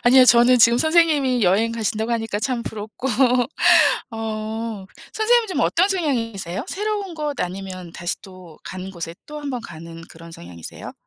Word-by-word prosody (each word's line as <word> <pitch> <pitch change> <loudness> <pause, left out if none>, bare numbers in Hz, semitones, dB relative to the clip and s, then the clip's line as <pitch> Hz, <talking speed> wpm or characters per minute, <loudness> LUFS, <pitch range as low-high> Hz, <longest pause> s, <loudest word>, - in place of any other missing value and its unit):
아니요. 255 +1 +7
저는 240 +1 +6
지금 235 +1 +6
선생님이 305 -6 +3
여행 210 +5 +2
가신다고 220 0 -2
하니까 225 -3 -2
참 245 -1 -1
부럽고 220 +5 -6 1.0
어. 220 -2 -5 0.3
선생님은 450 0 +2
좀 370 - -2
어떤 360 +4 +2
성향이세요? 230 - -2
새로운 410 -3 -3
곳 300 -2 -4
아니면 185 -1 -5
다시 175 +1 -4
또 185 -5 -14
가는 185 +1 -7
곳에 170 -3 -7
또 300 0 -8
한번 275 -4 -4
가는 165 -4 -10
그런 165 +1 -13
성향이세요? 85 - -10
225 Hz, 340 characters per minute, -21 LUFS, 185-275 Hz, 1.0 s, 아니요